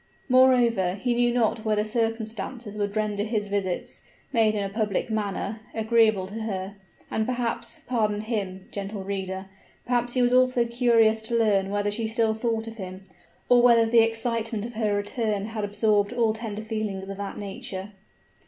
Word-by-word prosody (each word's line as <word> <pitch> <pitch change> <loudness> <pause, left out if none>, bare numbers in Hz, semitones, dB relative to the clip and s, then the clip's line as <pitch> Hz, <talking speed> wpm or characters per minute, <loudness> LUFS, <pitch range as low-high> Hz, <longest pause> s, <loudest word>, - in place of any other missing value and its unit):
Moreover, 245 -8 +4
he 240 +5 0
knew 240 0 +3
not 230 -2 +1
whether 215 -1 +1
circumstances 225 0 -3
would 205 0 -2
render 210 -1 0
his 215 -1 -1
visits, 195 -3 -2 0.3
made 220 -3 +3
in 205 - 0
a - - -1
public 215 +1 -1
manner, 210 0 -2 0.2
agreeable 220 -3 +3
to 210 +4 -6
her: 195 -3 -3 0.4
and, 220 - 0
perhaps 240 -2 -3
pardon 215 -4 0
him, 200 -4 -4
gentle 200 0 -5
reader 190 -1 -4 0.4
perhaps 245 0 0
he 250 - +3
was 245 0 +3
also 255 -1 +4
curious 230 -2 +3
to 230 +1 -1
learn 200 -4 +2
whether 205 0 0
she 220 +2 -2
still 225 0 +1
thought 225 0 -1
of 225 0 -8
him, 185 -1 -7 0.4
or 245 -1 +6
whether 235 -2 +6
the 230 +1 +4
excitement 225 -1 0
of 240 - -7
her 215 -2 0
return 205 0 -1
had 220 -1 -4
absorbed 205 0 +2
all 230 -3 +2
tender 220 -1 -5
feelings 215 -3 -3
of 195 0 -6
that 200 -1 -5
nature. 195 -1 -6
220 Hz, 170 wpm, -26 LUFS, 205-230 Hz, 0.4 s, or